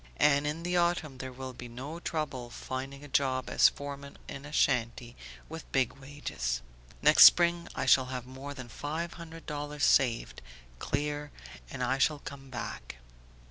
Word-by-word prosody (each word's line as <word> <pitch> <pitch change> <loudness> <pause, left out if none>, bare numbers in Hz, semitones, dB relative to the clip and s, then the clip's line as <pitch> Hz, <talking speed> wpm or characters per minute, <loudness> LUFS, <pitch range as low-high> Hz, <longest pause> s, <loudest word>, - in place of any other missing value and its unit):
And 145 0 +4
in 155 +3 -3
the 175 +1 0
autumn 170 -6 0
there 130 0 -5
will 130 0 -7
be 125 0 -9
no 135 +8 -7
trouble 140 -8 -3
finding 135 +3 -6
a - - -9
job 130 -2 0
as - - +6
foreman 140 0 -8
in 135 +1 -7
a 150 - -9
shanty, 120 -4 +1 0.3
with 160 0 -9
big 130 -3 +2
wages. 135 - -4 0.4
Next - - +9
spring 170 0 +6
I - - -1
shall 130 - +6
have 125 -1 -5
more 135 +2 -8
than 130 -3 -8
five 155 +8 -4
hundred 165 -1 -10
dollars 150 -1 -4
saved, 115 - +3 0.4
clear, 145 +1 -2 0.4
and 125 - -4
I 130 +2 +1
shall 150 +2 +3
come 140 -1 -10
back... - - -6
140 Hz, 165 wpm, -30 LUFS, 130-150 Hz, 0.4 s, Next